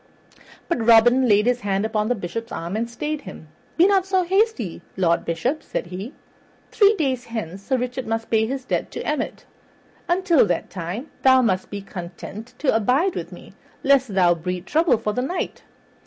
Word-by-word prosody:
But 275 -10 -1
Robin 240 +3 +6
laid 210 -1 +4
his 245 0 +2
hand 200 -2 -1
upon 215 -1 0
the 245 - +1
Bishop's 230 +4 -5
arm 170 +4 -4
and 230 +2 -2
stayed 300 +5 -4
him. 185 - -11 0.3
"Be 340 - +6
not 385 -1 +3
so 380 -1 +2
hasty, 365 - 0 0.2
Lord 170 -3 +2
Bishop," 245 - -1
said - - -4
he. 185 +8 -7 0.6
"Three 415 0 +5
days 260 -5 -1
hence 200 -5 -5
Sir 260 +6 0
Richard 250 0 -4
must 225 0 -3
pay 220 -1 +3
his 265 +1 -4
debts - - -1
to - - -4
Emmet; - - -3 0.6
until 345 - +3
that 175 - -2
time 185 - -5
thou 260 -1 +6
must 185 -5 0
be 200 -1 -6
content 195 +6 -9
to 275 -5 +1
abide 260 - +2
with - - -5
me - - -12 0.3
lest 265 -7 +3
thou 180 -2 +5
breed 180 +2 -4
trouble 315 - +3
for 215 -1 -2
the 250 - -1
Knight. 345 +9 -3
235 Hz, 185 wpm, -22 LUFS, 195-275 Hz, 0.6 s, Robin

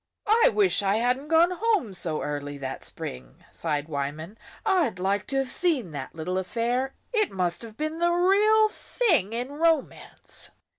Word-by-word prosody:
"I 450 +3 +5
wish 390 - +3
I 200 0 +1
hadn't 250 +5 0
gone 330 +3 +4
home 375 - 0
so 165 -4 -2
early 145 -1 -4
that 135 -1 -6
spring," 65 -1 -6
sighed 150 -2 -2
Wyman. 155 +5 -4 0.3
"I'd 325 - +2
like 195 +2 -1
to 275 - -4
have 270 -1 0
seen 290 - +1
that 140 -1 -7
little 180 +4 -2
affair. 240 +7 -2 0.2
It 430 -3 +2
must 180 -2 0
have 225 -2 -11
been 310 +1 -3
the 345 0 +3
real 405 +5 +4
thing 335 - 0
in 245 +3 -3
romance." 320 0 -2
245 Hz, 160 wpm, -26 LUFS, -, 0.3 s, I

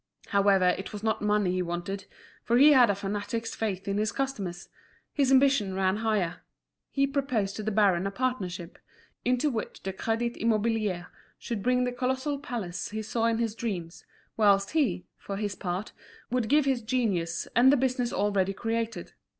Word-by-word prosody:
However, 200 -2 +4
it 190 +3 -3
was 210 0 -6
not 220 -1 0
money 210 -3 +2
he 185 0 0
wanted, 175 +3 -4 0.4
for 235 - +2
he 290 +4 +8
had 250 -5 +6
a 200 - +2
fanatic's 205 +3 -3
faith 200 -4 -3
in 200 +1 0
his 215 0 0
customers: 200 -10 -3 0.5
his 275 -3 +2
ambition 265 -8 +4
ran 190 +1 +1
higher: 210 -6 0 0.5
he 275 0 +2
proposed 260 -8 -1
to - - -3
the 215 - -1
baron 195 -3 +3
a - - 0
partnership, 195 -7 -3 0.4
into 250 +4 +1
which 225 -3 -5
the 190 - -3
Crédit 230 +4 -2
Immobilier 215 -5 0 0.3
should 230 -4 -4
bring 250 +3 +2
the 250 - 0
colossal 260 +3 -1
palace 220 - -4
he 215 +1 -4
saw 225 +2 -1
in 230 -1 +2
his 230 -2 -1
dreams, 185 -8 -5 0.3
whilst 200 -2 +4
he, 250 - +1
for 195 - -5
his 205 -1 -2
part, 185 +2 -4 0.4
would 250 -3 0
give 295 +1 +4
his 265 -3 +1
genius 205 -9 -1
and 250 +3 +7
the 285 - +4
business 250 -1 0
already 195 -1 +1
created. 230 +2 -3
215 Hz, 175 wpm, -28 LUFS, 195-245 Hz, 0.5 s, he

